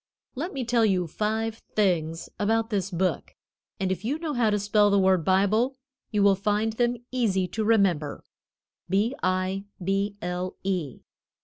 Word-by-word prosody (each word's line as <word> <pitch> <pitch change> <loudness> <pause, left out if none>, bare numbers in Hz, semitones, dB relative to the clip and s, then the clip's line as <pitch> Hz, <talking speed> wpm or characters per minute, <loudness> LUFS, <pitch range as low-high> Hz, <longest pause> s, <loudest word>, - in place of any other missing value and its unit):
Let 320 +8 -4
me 265 -3 -3
tell 235 -1 +2
you 190 -4 +2
five 220 +5 -2
things 165 -6 +1
about 225 +2 +1
this 195 -2 0
book, 185 0 -2 0.4
and 190 -1 0
if 190 +1 -3
you 265 +7 -1
know 320 -2 -3
how 240 -4 +2
to 210 - +2
spell 205 +1 +3
the 200 - +3
word 190 -3 +3
Bible 210 - +2 0.3
you 210 -2 +1
will 200 -1 +6
find 210 +3 0
them 240 +1 +1
easy 200 -7 +1
to 220 +4 -2
remember 195 -9 +2 0.7
B 205 +7 +2
I 185 +1 0 0.2
B 195 +2 0
L 180 +1 -3
E. 180 -9 -2
200 Hz, 165 wpm, -26 LUFS, 185-225 Hz, 0.7 s, will